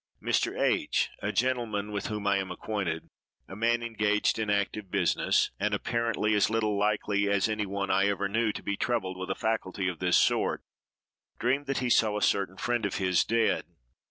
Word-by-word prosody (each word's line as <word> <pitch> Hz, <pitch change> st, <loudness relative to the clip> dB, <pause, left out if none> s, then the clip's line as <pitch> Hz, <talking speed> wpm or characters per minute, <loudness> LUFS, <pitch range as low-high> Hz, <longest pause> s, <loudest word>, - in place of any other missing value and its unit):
Mr. -, -, 0 dB
H——, -, -, +1 dB
a -, -, -1 dB
gentleman 115 Hz, -5 st, -1 dB
with 100 Hz, -1 st, -3 dB
whom 105 Hz, -1 st, -4 dB
I 100 Hz, 0 st, +3 dB
am 95 Hz, -1 st, -3 dB
acquainted—a 90 Hz, -1 st, -6 dB
man 120 Hz, +2 st, +1 dB
engaged 105 Hz, -2 st, +1 dB
in 110 Hz, -1 st, -1 dB
active 100 Hz, 0 st, -1 dB
business, -, -, +2 dB
and 105 Hz, +1 st, +1 dB
apparently 115 Hz, 0 st, 0 dB
as 105 Hz, 0 st, +3 dB
little 110 Hz, -2 st, 0 dB
likely 105 Hz, 0 st, +1 dB
as 100 Hz, 0 st, +2 dB
any 105 Hz, -1 st, -2 dB
one 100 Hz, 0 st, -2 dB
I 100 Hz, +1 st, +3 dB
ever 100 Hz, 0 st, 0 dB
knew 110 Hz, +2 st, +1 dB
to -, -, -7 dB
be 100 Hz, -, -1 dB
troubled 100 Hz, -5 st, -1 dB
with 95 Hz, 0 st, -6 dB
a 95 Hz, -, -1 dB
faculty 95 Hz, -4 st, -2 dB
of 90 Hz, -3 st, -3 dB
this 90 Hz, -1 st, +3 dB
sort—dreamed 135 Hz, +4 st, -2 dB
that 135 Hz, -, -1 dB
he 120 Hz, -, 0 dB
saw 105 Hz, -3 st, +3 dB
a -, -, -3 dB
certain 95 Hz, -1 st, +1 dB
friend 120 Hz, +1 st, -1 dB
of 100 Hz, -, -5 dB
his 95 Hz, -2 st, +2 dB
dead. 115 Hz, 0 st, +1 dB
105 Hz, 185 wpm, -28 LUFS, 100-110 Hz, -, I